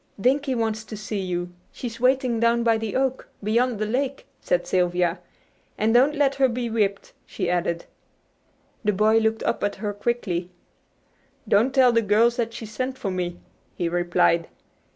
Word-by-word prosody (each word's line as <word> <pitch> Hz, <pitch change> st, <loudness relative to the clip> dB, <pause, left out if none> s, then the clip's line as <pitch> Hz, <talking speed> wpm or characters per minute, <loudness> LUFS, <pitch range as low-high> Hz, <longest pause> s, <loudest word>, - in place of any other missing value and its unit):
"Dinkie 265 Hz, +4 st, +2 dB
wants 220 Hz, -2 st, -1 dB
to 215 Hz, 0 st, -8 dB
see 215 Hz, 0 st, -4 dB
you. 180 Hz, -1 st, -3 dB, 0.2 s
She's 235 Hz, -2 st, -7 dB
waiting 255 Hz, -2 st, +2 dB
down 235 Hz, 0 st, +3 dB
by 225 Hz, -1 st, +3 dB
the 220 Hz, -2 st, -4 dB
oak, 265 Hz, 0 st, 0 dB, 0.2 s
beyond 235 Hz, +3 st, +1 dB
the 215 Hz, -, -1 dB
lake," 265 Hz, +5 st, -2 dB
said -, -, 0 dB
Sylvia. 180 Hz, -1 st, +1 dB, 0.6 s
"And 220 Hz, +1 st, +2 dB
don't 270 Hz, +5 st, +4 dB
let 280 Hz, -2 st, +2 dB
her 270 Hz, -1 st, +3 dB
be 235 Hz, -1 st, -3 dB
whipped," 200 Hz, -3 st, -1 dB
she 180 Hz, -3 st, -2 dB
added. 170 Hz, -1 st, -1 dB, 1.0 s
The 210 Hz, -1 st, +2 dB
boy 215 Hz, +3 st, +4 dB
looked 220 Hz, 0 st, 0 dB
up 235 Hz, -, -1 dB
at 205 Hz, -, 0 dB
her 205 Hz, 0 st, -4 dB
quickly. 200 Hz, -5 st, -2 dB, 1.0 s
"Don't 225 Hz, +6 st, +3 dB
tell 260 Hz, -2 st, +5 dB
the 230 Hz, -1 st, +3 dB
girls 225 Hz, +3 st, +3 dB
that 230 Hz, -1 st, -1 dB
she 230 Hz, -, -7 dB
sent 255 Hz, +5 st, -4 dB
for 195 Hz, -, -3 dB
me," 175 Hz, -1 st, -3 dB, 0.4 s
he 175 Hz, -, -1 dB
replied. 170 Hz, -1 st, +2 dB
225 Hz, 170 wpm, -24 LUFS, 195-245 Hz, 1.0 s, tell